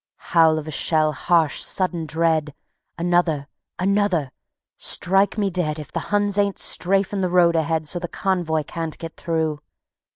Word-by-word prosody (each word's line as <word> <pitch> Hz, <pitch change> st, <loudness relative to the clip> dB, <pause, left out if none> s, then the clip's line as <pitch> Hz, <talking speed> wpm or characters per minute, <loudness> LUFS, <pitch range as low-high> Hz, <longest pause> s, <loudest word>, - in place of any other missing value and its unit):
Howl 160 Hz, -2 st, +5 dB
of 155 Hz, 0 st, -5 dB
a -, -, -5 dB
shell, 155 Hz, +1 st, +1 dB
harsh, 165 Hz, -3 st, +1 dB
sudden, 175 Hz, -4 st, 0 dB
dread; 160 Hz, -2 st, 0 dB, 0.4 s
Another... 170 Hz, -4 st, +1 dB, 0.3 s
another.... 190 Hz, -7 st, +1 dB, 0.5 s
"Strike 195 Hz, +4 st, +2 dB
me 200 Hz, -2 st, 0 dB
dead 165 Hz, -4 st, -1 dB
If 150 Hz, -1 st, -9 dB
the -, -, -2 dB
Huns 205 Hz, -1 st, +1 dB
ain't 200 Hz, -1 st, +1 dB
strafing 195 Hz, +2 st, +1 dB
the 185 Hz, -, 0 dB
road 175 Hz, -1 st, +4 dB
ahead 160 Hz, -1 st, 0 dB
So 175 Hz, -, 0 dB
the 175 Hz, -, -4 dB
convoy 170 Hz, -5 st, -1 dB
can't 165 Hz, +1 st, -6 dB
get 165 Hz, -1 st, -8 dB
through! 160 Hz, -3 st, -2 dB
170 Hz, 155 wpm, -22 LUFS, 155-185 Hz, 0.5 s, Howl